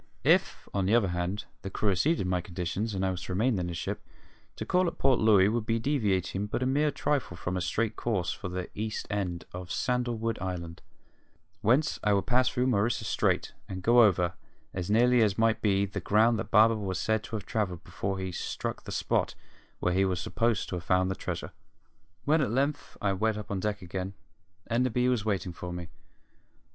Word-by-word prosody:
If, - - +2
on 95 -2 0
the 110 - +4
other 105 -6 +3
hand, 90 +4 -2 0.2
the 95 - -5
crew 100 +1 0
acceded 150 - +2
to - - -2
my 90 -1 0
conditions, 90 +5 -3
and 95 0 0
I 95 - +1
was 90 -1 -5
to 95 - -4
remain 110 +2 +2
in 90 - -2
the 85 - -4
ship, 80 - -4 0.5
to - - -5
call 180 0 +2
at 170 - -4
Port 135 -2 +3
Louis 105 -3 +6
would 110 +1 -1
be 115 - +2
deviating 105 - 0
but 120 - -2
a - - +1
mere 145 +4 +2
trifle 140 - -1
from 90 +1 -3
a 90 - -1
straight 110 +4 -1
course 100 -7 -1
for 90 - -5
the 90 0 -5
east 110 +1 -3
end 95 -4 -2
of 90 -1 -7
Sandalwood 120 -2 -1
Island, 85 -2 -5 0.8
whence 130 +8 +2
I 105 - +3
would 100 - +1
pass 125 +2 +3
through 125 0 0
Maurissa 115 -2 +1
Strait - - 0 0.2
and 95 -1 -5
go 120 +3 +6
over, 90 -5 +4 0.4
as 90 0 -4
nearly 120 +3 +5
as 105 -3 +2
might 115 0 +2
be, 100 -2 +2
the 100 0 -5
ground 110 +5 +3
that - - -4
Barber 110 +1 +6
was 95 -4 -3
said 110 +2 0
to - - -6
have 105 -3 -5
travelled 95 -6 -2
before 95 +1 -3
he 95 -1 -3
struck - - -4
the - - -6
spot - - 0 0.5
where 90 - +1
he 95 +2 +3
was 95 -2 0
supposed 115 +2 0
to 90 - -2
have 85 - -7
found 95 +1 +2
the - - -2
treasure. - - -5 0.7
When 155 +2 +4
at 135 - +1
length 140 +5 -1
I 100 -1 +2
went 110 +3 0
up 105 - -7
on 100 - -1
deck 105 0 -2
again, 95 +2 -5 0.5
Enderby 125 +1 +1
was 120 -4 0
waiting 95 -4 -1
for 90 +1 -6
me. 90 -1 -6
105 Hz, 210 wpm, -29 LUFS, 95-115 Hz, 0.8 s, Louis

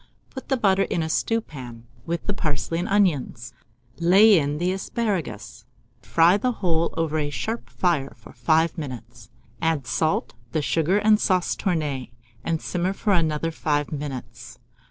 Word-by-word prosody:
Put 265 - -9
the 265 - +2
butter 195 -4 +3
in 170 -4 0
a 160 - -3
stewpan, 130 - -3 0.2
with 170 +1 -3
the 205 - 0
parsley 155 -1 -2
and 175 - -2
onions; 165 - +1 0.5
lay 195 +3 +6
in 145 0 -1
the 175 +3 0
asparagus, 170 - -3 0.4
and 95 - -21
fry 170 +4 +5
the 250 +4 0
whole 170 -6 0
over 160 -1 0
a 145 -1 -1
sharp 225 +10 -4
fire 160 -7 0
for - - -15
5 160 +1 +1
minutes. 120 -6 -8 0.3
Add 160 -5 0
salt, 155 +5 0 0.2
the 155 - +1
sugar 165 +6 +2
and 210 0 +4
sauce 185 -4 +1
tournée, 150 -9 -2 0.3
and 165 -1 -1
simmer 180 +2 -1
for 205 +1 0
another 165 -2 +1
5 150 -2 -1
minutes. 125 -6 -7
165 Hz, 155 wpm, -24 LUFS, 145-190 Hz, 0.5 s, lay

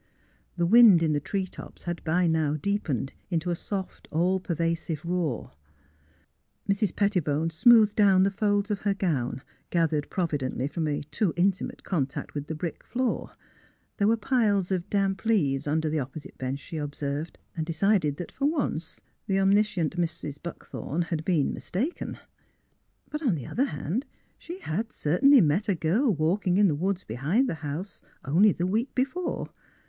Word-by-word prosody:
The 170 - +2
wind 205 -3 +7
in 155 -2 +2
the 145 - +1
tree 190 +6 -2
tops 185 - -11
had 175 -1 -4
by 175 +3 +2
now 160 -3 +1
deepened 155 - -2 0.2
into 175 0 -1
a - - 0
soft, 190 +2 -5
all 180 +4 +2
pervasive 165 -2 -2
roar. 170 -9 -2 1.2
Mrs. 200 -1 +1
Pettibone 165 -6 +1
smoothed 215 +5 +6
down 195 -3 +5
the 195 - +2
folds 205 +1 0
of 205 - -1
her 200 -1 0
gown, 135 -9 -1 0.3
gathered 160 -4 +1
providently 140 -7 -1
from 160 +1 -2
a 145 -1 -1
too 205 -7 +1
intimate 185 +2 0
contact 145 -8 -2
mth 145 0 -4
the 160 - -4
brick 160 +1 -5
floor. 255 0 -2 0.6
There 200 - +2
were 225 +1 +3
piles 205 -5 +1
of 180 -2 -1
damp 195 -1 0
leaves 150 -12 +1
under 155 +2 +1
the 155 0 0
opposite 140 +3 -7
bench, 130 +1 -2
she 155 +2 -7
ob 145 -1 -4
THE - - -11
CLOSED - - -8
DOOR 140 - 0 0.2
53 - - -21
served, - - -27 0.2
and 160 - -1
decided 165 -3 +2
that, 175 - -6
for 275 - -2
once, 275 - -2 0.3
the 195 - +1
omniscient 195 -4 +2
Mrs. 160 -4 -3
Buckthorn 170 -1 -4
had 165 -2 -3
been 160 -5 +1
mistaken. 260 - -3 0.9
But, 300 - -3
on 245 - +2
the 135 -6 -6
other 265 - 0
hand, 245 - -3 0.3
she 350 +3 -8
had 215 +8 -3
certainly 255 - +5
met 170 +6 +1
a 195 - +3
girl 200 - +2
walking 175 +4 +1
in 205 0 +6
the 160 - +2
woods 185 +5 -1
behind 150 - 0
the - - -1
house, 155 +7 -5 0.2
only 180 +10 +5
the 175 - -2
week 220 +8 -1
be 255 - +4
fore. 355 +5 -4
175 Hz, 175 wpm, -27 LUFS, 155-205 Hz, 1.2 s, wind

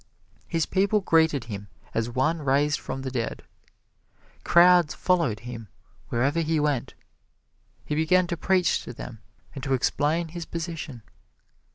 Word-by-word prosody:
His 165 -2 0
people 200 +2 +2
greeted 160 -7 +3
him 105 -3 -7 0.3
as 115 +1 -1
one 150 +7 0
raised 145 +2 +2
from 135 - -5
the 130 - -4
dead. 120 -3 -3 1.0
Crowds 175 -2 +5
followed 165 - +1
him 115 -2 -8 0.4
wherever 135 +7 +1
he 160 -1 +1
went. 145 -4 -1 0.9
He - - -3
began 160 +4 +3
to 170 - -3
preach 180 0 +2
to 120 - -7
them 115 -1 -9 0.3
and 135 - -8
to 135 -1 +1
explain 155 +6 0
his 170 0 -7
position. 160 -8 -6
150 Hz, 140 wpm, -26 LUFS, 130-170 Hz, 1.0 s, Crowds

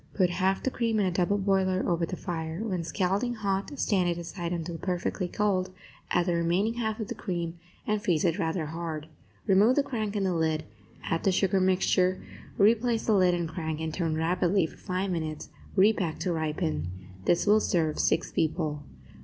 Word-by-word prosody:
Put 180 -3 +3
half 190 +2 +1
the 265 - 0
cream 230 -3 0
in 200 - +3
a 185 - +1
double 180 +3 +1
boiler 190 -1 +1
over 170 -1 +1
the 185 - -4
fire; 165 -2 -4
when 185 -6 -2
scalding 195 +7 0
hot, 200 +5 -2
stand 185 -7 +2
it 170 - -1
aside 170 0 -5
until 170 -1 -4
perfectly 180 0 -2
cold; 185 -1 0 0.4
add 175 - +2
the 175 - +1
remaining 175 +6 +1
half 220 -2 -2
of 215 - -3
the - - -3
cream 170 -2 -4 0.3
and 210 -1 0
freeze 170 -3 +2
it 170 +3 +1
rather 165 -1 -1
hard. 160 -1 -5 0.4
Remove 210 +5 +5
the 285 - +3
crank 220 -6 -3
and 200 -2 0
the 185 - +1
lid, 160 -1 0 0.4
add 165 - -1
the 195 - +3
sugar 190 +1 +2
mixture, 185 0 +2 0.4
replace 230 +3 +3
the 220 - +3
lid 185 -3 +4
and 170 -1 -1
crank, 160 -1 -4
and 160 -1 -3
turn 165 -3 -1
rapidly 175 +2 +2
for - - -9
five 185 0 -2
minutes; 155 -3 -3 0.3
repack 190 -4 +3
to 180 - 0
ripen. 150 - -1 0.4
This 170 - +3
will 210 +1 +5
serve 165 -7 0
six 165 - +1
people. 155 -2 -1
180 Hz, 190 wpm, -28 LUFS, 165-200 Hz, 0.4 s, Remove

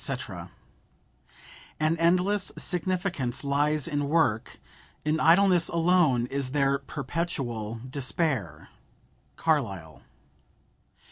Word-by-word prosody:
"An 155 +1 +2
endless 180 +4 +2
significance 180 - -1
lies 145 +1 +1
in 145 -3 -2
work; 145 -9 +1 0.5
in 155 +1 +1
idleness 180 +1 +5
alone 165 -7 +3
is 135 +1 -3
there 140 0 +1
perpetual 125 -9 -4
despair."—CARLYLE. 125 - -3
150 Hz, 70 wpm, -27 LUFS, 130-170 Hz, 0.5 s, idleness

